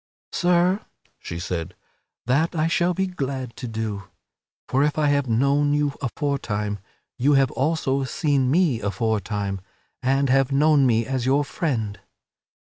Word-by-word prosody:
"Sir," 180 +2 +2 0.4
she 85 - -6
said, 85 -1 -4 0.5
"that 155 +8 +1
I 155 -1 +1
shall 175 +1 +1
be 190 - +1
glad 135 -8 -4
to 125 - -5
do; 110 -3 -4 0.6
for 135 - +1
if 150 +1 0
I 150 -1 +3
have 140 -3 +1
known 140 +5 +2
you 145 -1 +1
aforetime, 115 -7 -2 0.4
you 140 +4 +4
have 135 -3 +3
also 140 -2 0
seen 140 -3 +1
me 150 -6 +2
afore 105 +2 0
time 100 -1 -3 0.4
and 135 +2 +2
have 135 +1 +3
known 145 -1 +4
me 115 -1 +2
as 130 0 -2
your 140 +2 +3
friend." 115 - -2
135 Hz, 145 wpm, -23 LUFS, 115-145 Hz, 0.6 s, you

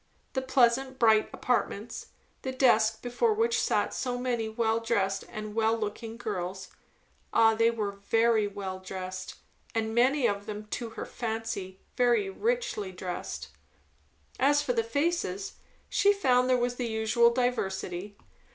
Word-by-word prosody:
The 265 - 0
pleasant, 260 0 +2
bright 220 -3 +4
apartments; 235 -2 -2 0.3
the 260 - -3
desks 225 -4 +4
before 250 - 0
which 460 +1 +2
sat - - +1
so 250 -1 -2
many 240 -3 -1
well 225 0 +1
dressed 200 -4 0
and 215 0 -6
well 225 +1 +2
looking 225 +1 -5
girls; 190 -3 -4 0.6
ah, 225 -1 +5
they 230 +1 +3
were 215 -3 -2
very 220 +2 +2
well 195 -2 -5
dressed, 185 0 -6 0.4
and 220 0 0
many 255 +3 +3
of 205 -2 0
them, 210 0 -5
to 235 -2 -3
her - - -3
fancy, 220 -5 -4 0.2
very 235 -6 +3
richly 470 - -1
dressed; 180 -1 -5 0.9
as 290 +2 +4
for 250 - 0
the 230 -1 +1
faces, 230 - -1 0.3
she 405 - +4
found 255 -11 +3
there 255 - +4
was 245 0 -1
the 245 - -2
usual 220 +1 +3
diversity. 200 -6 -2
225 Hz, 140 wpm, -29 LUFS, 205-250 Hz, 0.9 s, ah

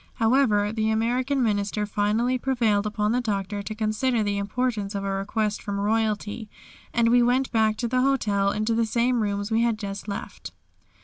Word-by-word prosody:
However, 225 -4 +2
the 220 0 0
American 250 +5 0
Minister 210 -1 0
finally 215 +5 0
prevailed 230 -6 +1
upon 210 0 -1
the 250 +2 +1
Doctor 205 -2 -2
to 215 +2 -6
consider 220 +2 0
the 200 -1 -1
importance 210 -1 -2
of 200 - -2
a 195 - -2
request 210 +2 -2
from 200 -1 -4
royalty, 215 0 -1 0.4
and 230 0 +2
we 245 +1 +5
went 250 +2 +2
back 220 -2 +2
to 240 - -1
the 255 +2 +1
hotel 210 -7 +1
into 215 +2 -1
the 225 0 +1
same 235 +2 +1
rooms 205 0 -2
we 225 +1 +2
had 235 -2 +1
just 200 -1 -6
left. 200 - -7
220 Hz, 180 wpm, -25 LUFS, 205-235 Hz, 0.4 s, we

